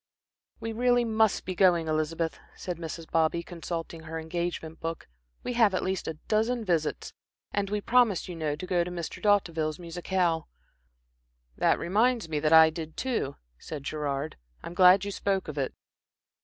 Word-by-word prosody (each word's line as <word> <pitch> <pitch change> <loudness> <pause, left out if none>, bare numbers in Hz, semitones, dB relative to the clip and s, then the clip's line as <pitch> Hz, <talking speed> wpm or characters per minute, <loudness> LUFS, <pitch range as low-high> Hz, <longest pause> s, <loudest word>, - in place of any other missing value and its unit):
"We 225 - -4
really 245 +1 +3
must 220 -2 +2
be 185 - -3
going, 175 -3 +4
Elizabeth," 155 +1 -1 0.2
said 180 -2 -5
Mrs. 165 0 -6
Bobby, 165 +1 +2
consulting 165 -1 -6
her 160 0 -6
engagement 165 0 -4
book. 165 0 -5 0.4
"We - - -2
have 225 -5 +4
at - - -1
least 190 -1 -2
a 160 - -3
dozen 225 +2 +1
visits, 165 -5 -1 0.4
and 200 -1 -1
we 210 0 -1
promised, 235 -5 +3
you 180 - -6
know, 155 -3 -1
to 155 - -7
go 180 -1 +1
to 175 - -5
Mr. 175 -2 -6
D'Hauteville's 165 -7 +2
musicale." 175 -1 -1 1.1
"That - - +3
reminds 220 +4 +1
me 155 -2 -1
that 155 +1 +1
I 160 0 +8
did 160 -1 -7
too," 235 - -1 0.2
said 150 -3 -7
Gerard. 145 0 -3 0.3
"I'm - - -6
glad 185 +2 +6
you 200 - -3
spoke 195 -1 -1
of 150 -2 -4
it." 135 - -1
170 Hz, 170 wpm, -28 LUFS, 160-200 Hz, 1.1 s, I